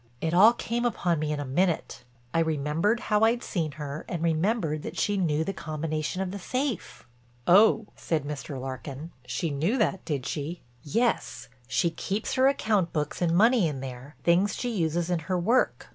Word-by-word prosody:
It 160 Hz, +4 st, -1 dB
all 210 Hz, +6 st, +7 dB
came 240 Hz, 0 st, -2 dB
upon 175 Hz, -9 st, 0 dB
me 155 Hz, 0 st, -1 dB
in 150 Hz, -, -2 dB
a 145 Hz, -, -3 dB
minute—I 130 Hz, -4 st, -2 dB
remembered 160 Hz, +8 st, +1 dB
how 210 Hz, -1 st, +1 dB
I'd 235 Hz, +2 st, +3 dB
seen 160 Hz, -5 st, -2 dB
her 150 Hz, 0 st, -6 dB
and 170 Hz, -2 st, -3 dB
remembered 165 Hz, -1 st, +1 dB
that -, -, -7 dB
she 205 Hz, -, +1 dB
knew 160 Hz, -5 st, +1 dB
the 195 Hz, -, -3 dB
combination 155 Hz, +2 st, -3 dB
of 185 Hz, -, -4 dB
the 200 Hz, -, -5 dB
safe." 255 Hz, -, -3 dB, 0.4 s
"Oh," 215 Hz, +4 st, +6 dB
said 160 Hz, -4 st, -1 dB
Mr. 145 Hz, -1 st, -5 dB
Larkin, 135 Hz, +4 st, -6 dB, 0.2 s
"she 165 Hz, -, -2 dB
knew 165 Hz, -, 0 dB
that, 210 Hz, -5 st, 0 dB
did 140 Hz, -5 st, -3 dB
she?" 155 Hz, +4 st, -4 dB, 0.2 s
"Yes, 230 Hz, -, -1 dB, 0.2 s
she 170 Hz, +5 st, +1 dB
keeps 200 Hz, +6 st, -3 dB
her 260 Hz, +1 st, +4 dB
account 215 Hz, -10 st, +1 dB
books 150 Hz, +1 st, -3 dB
and 170 Hz, -1 st, +2 dB
money 225 Hz, -2 st, +5 dB
in 145 Hz, -4 st, -4 dB
there, 130 Hz, +2 st, -8 dB
things 180 Hz, +4 st, +3 dB
she 245 Hz, -, -2 dB
uses 170 Hz, -3 st, 0 dB
in 175 Hz, -, +1 dB
her 180 Hz, +4 st, -2 dB
work. 225 Hz, +9 st, +1 dB
170 Hz, 180 wpm, -27 LUFS, 150-205 Hz, 0.4 s, all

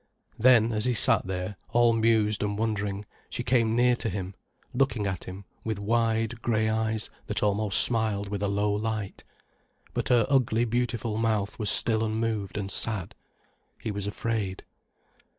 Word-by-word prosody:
Then, 115 Hz, -1 st, +5 dB
as 105 Hz, +1 st, 0 dB
he 125 Hz, -1 st, +1 dB
sat 100 Hz, -, +4 dB
there, 95 Hz, +1 st, -4 dB, 0.2 s
all 120 Hz, -1 st, +5 dB
mused 110 Hz, -2 st, +2 dB
and 105 Hz, -1 st, -1 dB
wondering, 105 Hz, -2 st, -2 dB, 0.2 s
she -, -, -4 dB
came 115 Hz, -3 st, +2 dB
near 125 Hz, +1 st, +4 dB
to 115 Hz, -, -2 dB
him, 95 Hz, 0 st, -5 dB, 0.4 s
looking 125 Hz, -5 st, +1 dB
at 95 Hz, -3 st, -3 dB
him 95 Hz, +2 st, -9 dB, 0.2 s
with 110 Hz, -2 st, -2 dB
wide, 115 Hz, +2 st, 0 dB
grey 110 Hz, -2 st, +1 dB
eyes 110 Hz, 0 st, -1 dB, 0.2 s
that -, -, -1 dB
almost 105 Hz, 0 st, +2 dB
smiled 110 Hz, -4 st, +1 dB
with 100 Hz, 0 st, -4 dB
a 100 Hz, -, +1 dB
low 100 Hz, +1 st, 0 dB
light. 105 Hz, -1 st, -3 dB, 0.7 s
But -, -, -2 dB
her 120 Hz, -3 st, +4 dB
ugly 120 Hz, -4 st, +2 dB
beautiful 120 Hz, -2 st, -1 dB
mouth 110 Hz, -2 st, -1 dB
was 105 Hz, -, +1 dB
still 110 Hz, -1 st, +3 dB
unmoved 110 Hz, -3 st, -2 dB
and 100 Hz, -1 st, -3 dB
sad. 105 Hz, -6 st, -2 dB, 0.7 s
He 110 Hz, -, -4 dB
was 100 Hz, -1 st, -3 dB
afraid. 105 Hz, -2 st, -3 dB
110 Hz, 160 wpm, -27 LUFS, 100-115 Hz, 0.7 s, Then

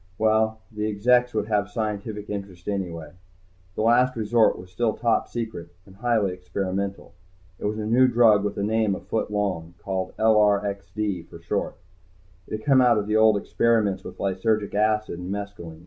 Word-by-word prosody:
Well, 110 Hz, 0 st, +2 dB
the 105 Hz, 0 st, -3 dB
exects 125 Hz, +4 st, +3 dB
would 105 Hz, -1 st, 0 dB
have 105 Hz, -2 st, 0 dB
scientific 105 Hz, -1 st, -4 dB
interest 100 Hz, -4 st, -7 dB
anyway. 85 Hz, -6 st, -4 dB, 0.6 s
The -, -, -1 dB
Last 125 Hz, +3 st, +4 dB
Resort 110 Hz, 0 st, +2 dB
was 90 Hz, 0 st, -12 dB
still 110 Hz, +3 st, 0 dB
Top 115 Hz, -1 st, +1 dB
Secret. 110 Hz, -8 st, -5 dB, 0.2 s
And 95 Hz, -1 st, -17 dB
highly 110 Hz, -4 st, +1 dB
experimental. 95 Hz, +1 st, -4 dB, 0.5 s
It -, -, -5 dB
was 105 Hz, +1 st, -1 dB
a 110 Hz, -, -3 dB
new 125 Hz, +4 st, +4 dB
drug 115 Hz, -4 st, +5 dB
with 105 Hz, 0 st, -3 dB
a 100 Hz, -, -1 dB
name 110 Hz, -1 st, +1 dB
a -, -, -6 dB
foot 110 Hz, -, -3 dB
long, 95 Hz, -5 st, -2 dB
called 95 Hz, 0 st, -4 dB
LRXD 100 Hz, -3 st, +1 dB
for 85 Hz, -, -11 dB
short. 85 Hz, -, -3 dB, 0.7 s
It -, -, -9 dB
had 110 Hz, -, -14 dB
come 135 Hz, -2 st, +5 dB
out 120 Hz, -3 st, +5 dB
of 105 Hz, -, -1 dB
the 105 Hz, +1 st, -1 dB
old 110 Hz, -1 st, +5 dB
experiments 105 Hz, -3 st, +1 dB
with -, -, -9 dB
lysergic 100 Hz, +2 st, 0 dB
acid 105 Hz, -3 st, 0 dB
and 90 Hz, +1 st, -6 dB
mescalin. 100 Hz, -6 st, -6 dB
105 Hz, 175 wpm, -24 LUFS, 95-110 Hz, 0.7 s, drug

